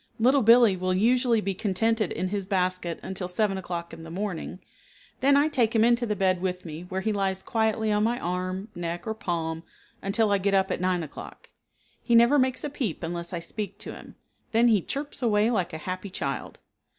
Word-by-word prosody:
Little 260 Hz, +4 st, +4 dB
Billee 230 Hz, -2 st, +6 dB
will 185 Hz, 0 st, 0 dB
usually 235 Hz, +2 st, +3 dB
be 195 Hz, -1 st, -1 dB
contented 215 Hz, +1 st, 0 dB
in 185 Hz, +3 st, -2 dB
his 200 Hz, -1 st, -3 dB
basket 185 Hz, -3 st, -1 dB
until 190 Hz, -1 st, -4 dB
7 195 Hz, +2 st, 0 dB
o'clock 175 Hz, -3 st, -5 dB
in 165 Hz, -, -9 dB
the 165 Hz, -, -9 dB
morning, 180 Hz, -1 st, -4 dB, 0.6 s
then 280 Hz, +1 st, +4 dB
I 290 Hz, +2 st, +4 dB
take 240 Hz, -7 st, +1 dB
him 220 Hz, -, +5 dB
into 240 Hz, +1 st, +3 dB
the 210 Hz, -, 0 dB
bed 185 Hz, -2 st, +1 dB
with 180 Hz, -1 st, -3 dB
me 160 Hz, +2 st, -7 dB
where 190 Hz, +1 st, -2 dB
he 220 Hz, +2 st, 0 dB
lies 190 Hz, -1 st, -1 dB
quietly 220 Hz, -1 st, 0 dB
on 210 Hz, 0 st, +2 dB
my 235 Hz, +2 st, +1 dB
arm, 185 Hz, +3 st, -3 dB
neck, 175 Hz, 0 st, -4 dB
or 220 Hz, -, -2 dB
palm 165 Hz, -5 st, -3 dB, 0.4 s
until 210 Hz, +2 st, +1 dB
I 200 Hz, -, +3 dB
get 195 Hz, +1 st, +1 dB
up 190 Hz, 0 st, +2 dB
at -, -, -2 dB
9 180 Hz, -2 st, +1 dB
o'clock. 150 Hz, -, -10 dB, 0.5 s
He 235 Hz, -, +2 dB
never 235 Hz, +5 st, +6 dB
makes 255 Hz, -1 st, +1 dB
a 295 Hz, -, -2 dB
peep 225 Hz, -, -3 dB
unless 170 Hz, +1 st, -4 dB
I 180 Hz, -, -3 dB
speak 200 Hz, +5 st, -5 dB
to -, -, -7 dB
him, -, -, -12 dB, 0.4 s
then 235 Hz, +2 st, +5 dB
he 210 Hz, -4 st, +4 dB
chirps 285 Hz, -, -5 dB
away 220 Hz, -1 st, +3 dB
like 185 Hz, -7 st, 0 dB
a 160 Hz, -, -5 dB
happy 185 Hz, +5 st, -5 dB
child. 140 Hz, -6 st, -4 dB
195 Hz, 210 wpm, -26 LUFS, 180-225 Hz, 0.6 s, Billee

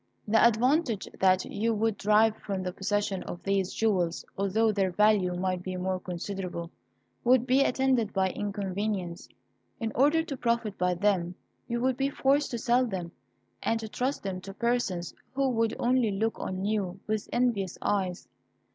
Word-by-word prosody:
The 220 Hz, +1 st, +4 dB
advantage 235 Hz, -, +3 dB
that 185 Hz, -1 st, +4 dB
you 225 Hz, +2 st, -1 dB
would 220 Hz, 0 st, +1 dB
derive 215 Hz, +1 st, +4 dB
from 195 Hz, -2 st, -4 dB
the 180 Hz, -1 st, -3 dB
possession 205 Hz, 0 st, -1 dB
of 175 Hz, -, -7 dB
these 195 Hz, -2 st, 0 dB
jewels, 185 Hz, -6 st, 0 dB
although 210 Hz, +3 st, +2 dB
their 195 Hz, -2 st, +1 dB
value 195 Hz, -1 st, +3 dB
might 185 Hz, 0 st, -1 dB
be 185 Hz, 0 st, -5 dB
more 185 Hz, 0 st, -1 dB
considerable, 180 Hz, -1 st, -5 dB, 0.5 s
would 250 Hz, 0 st, +4 dB
be 260 Hz, +1 st, +4 dB
attended 260 Hz, -5 st, +2 dB
by 190 Hz, -1 st, +1 dB
inconvenience. 200 Hz, -3 st, -3 dB, 0.5 s
In 225 Hz, -1 st, -2 dB
order 295 Hz, +6 st, +4 dB
to 295 Hz, -4 st, -5 dB
profit 235 Hz, -4 st, 0 dB
by 180 Hz, -1 st, +1 dB
them 180 Hz, -2 st, +1 dB, 0.3 s
you 235 Hz, 0 st, -1 dB
would 255 Hz, 0 st, +1 dB
be 275 Hz, 0 st, +1 dB
forced 280 Hz, +1 st, +2 dB
to 240 Hz, -, -3 dB
sell 245 Hz, +2 st, +2 dB
them, 180 Hz, -5 st, -4 dB, 0.5 s
and 225 Hz, -, 0 dB
to 220 Hz, -, -5 dB
trust 255 Hz, +6 st, -2 dB
them 190 Hz, -2 st, -4 dB
to 195 Hz, +1 st, -9 dB
persons 220 Hz, -7 st, -1 dB, 0.2 s
who 275 Hz, 0 st, +2 dB
would 230 Hz, -2 st, +1 dB
only 245 Hz, -2 st, +2 dB
look 220 Hz, +3 st, -1 dB
on 185 Hz, +1 st, -3 dB
you 200 Hz, -3 st, -1 dB
with 215 Hz, -1 st, -2 dB
envious 230 Hz, -7 st, 0 dB
eyes. 190 Hz, -3 st, -1 dB
205 Hz, 165 wpm, -28 LUFS, 185-235 Hz, 0.5 s, The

